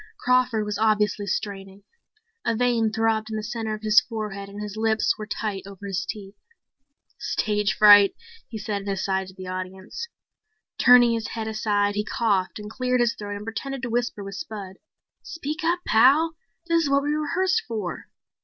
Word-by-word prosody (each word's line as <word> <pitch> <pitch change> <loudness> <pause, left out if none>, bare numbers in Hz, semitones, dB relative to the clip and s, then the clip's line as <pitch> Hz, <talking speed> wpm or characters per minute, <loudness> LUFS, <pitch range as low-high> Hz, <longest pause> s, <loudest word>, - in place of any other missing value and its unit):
Crawford 250 -3 +2
was 210 0 -3
obviously 210 -2 +1
straining. 195 0 -4 0.6
A 230 - 0
vein 235 -2 +2
throbbed 220 0 0
in 220 - -4
the 215 - -4
center 220 0 -3
of 215 - -12
his 215 +3 +6
forehead 210 -5 -6
and 200 +1 -9
his 210 -1 -6
lips 220 0 +2
were 215 -1 -7
tight 210 -2 -3
over 200 0 -10
his 190 -1 -3
teeth. 200 -2 -7 0.9
"Stage 210 -2 0
fright," 205 -1 +8 0.3
he 225 - -6
said 210 -1 -3
in 200 - -10
an 195 - 0
aside 190 0 -1
to 185 - -13
the 185 -1 -9
audience. 185 - -6 0.7
Turning 245 -1 +7
his 230 -1 -2
head 220 -1 -5
aside, 205 -2 0
he 210 0 -1
coughed 210 -5 0
and 210 -1 -8
cleared 250 +3 -1
his 240 -1 +2
throat 205 -1 -6
and 205 +1 -7
pretended 265 +4 -5
to 240 - -3
whisper 240 -3 -1
with 195 0 -7
Spud. 200 -8 -7 0.4
"Speak 310 0 -5
up, 345 +2 +1
Pal. 285 +9 +4 0.3
This 335 -1 +2
is - - -1
what 280 0 +3
we 290 - -1
rehearsed 360 +5 +1
for." 215 -7 -4
215 Hz, 180 wpm, -24 LUFS, 200-240 Hz, 0.9 s, fright